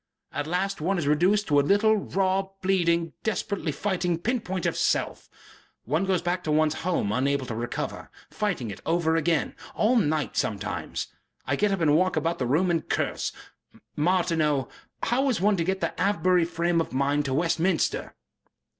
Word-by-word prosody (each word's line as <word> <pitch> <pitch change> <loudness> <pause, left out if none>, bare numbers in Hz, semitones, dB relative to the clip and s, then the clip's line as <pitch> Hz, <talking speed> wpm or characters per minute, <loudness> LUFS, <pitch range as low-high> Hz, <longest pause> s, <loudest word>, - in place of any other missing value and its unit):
At 145 - -3
last 190 +2 -1
one 190 +4 +1
is 165 - -1
reduced 185 +8 +3
to 145 -2 +4
a - - +5
little, 205 +8 +4
raw, 195 -1 0 0.2
bleeding, 170 -3 +1
desperately 200 -6 -2
fighting, 175 +1 -1
pin 235 +8 -1
point 185 -4 -4
of - - 0
SELF.... - - -1 0.6
One 155 - 0
goes 185 -3 +1
back 180 +1 -1
to 155 - 0
one's 155 0 +3
home 170 - 0
unable 135 +3 0
to 120 - -5
recover. 120 +2 -4 0.2
Fighting 180 - -2
it - - -9
over 165 -1 +1
again. 165 -1 +1 0.2
All 225 +4 +3
night 155 - +1
sometimes.... 100 -3 -3 0.4
I 145 - 0
get 210 +6 +1
up 195 -3 -1
and 150 -2 +4
walk 185 +2 +2
about 165 +2 -1
the 125 - 0
room 170 +8 +2
and 165 -2 -1
curse.... - - -1 0.6
Martineau, 155 -4 +1 0.3
how 265 +4 +2
is 245 - 0
one 205 +2 +3
to 170 - +1
get 190 +3 -1
the - - -1
Avebury 185 -3 +3
frame 170 0 0
of 160 - -5
mind 140 +2 +1
to 135 - -1
Westminster?" 165 +2 0
170 Hz, 175 wpm, -26 LUFS, 150-190 Hz, 0.6 s, a